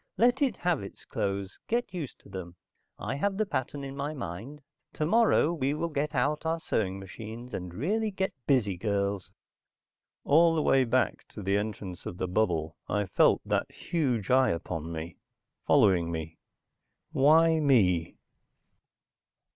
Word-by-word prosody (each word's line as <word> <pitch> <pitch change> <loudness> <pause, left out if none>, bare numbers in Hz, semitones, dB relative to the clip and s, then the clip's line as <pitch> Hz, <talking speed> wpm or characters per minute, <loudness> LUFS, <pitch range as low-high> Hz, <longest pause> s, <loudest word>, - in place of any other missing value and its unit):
"Let 245 +4 +3
it 260 -8 +2
have 175 -4 0
its 100 - -10
clothes, 100 -1 -3
get 235 -4 -1
used 160 -8 -5
to - - -17
them. 90 -2 -7 0.4
I - - -3
have 195 +5 0
the 215 - +1
pattern 140 -5 -3
in 135 0 -6
my 145 +2 -3
mind. 125 - -7 0.3
Tomorrow 175 0 +3
we 140 -3 0
will 170 +2 -2
get 150 0 -2
out 145 +4 +1
our 165 0 0
sewing 95 -10 -1
machines, 110 +5 -9
and 90 -2 -4
really 205 - 0
get 190 -1 -2
busy, 110 -10 +2
girls." 100 -1 -1 0.9
All 165 +3 +5
the 155 - +1
way 135 -1 +4
back 130 +2 0
to 105 - -9
the 100 +1 +1
entrance 100 -3 -4
of 85 - -6
the 95 - -2
bubble, 85 -5 0
I 105 0 +1
felt - - +3
that - - 0
huge 125 - -1
eye 130 0 +5
upon 85 -1 -3
me, 80 +1 -6 0.5
following 85 -3 +4
me. 80 0 -5 0.7
Why 160 +3 +5
me? 95 - +3
125 Hz, 155 wpm, -29 LUFS, 95-155 Hz, 0.9 s, All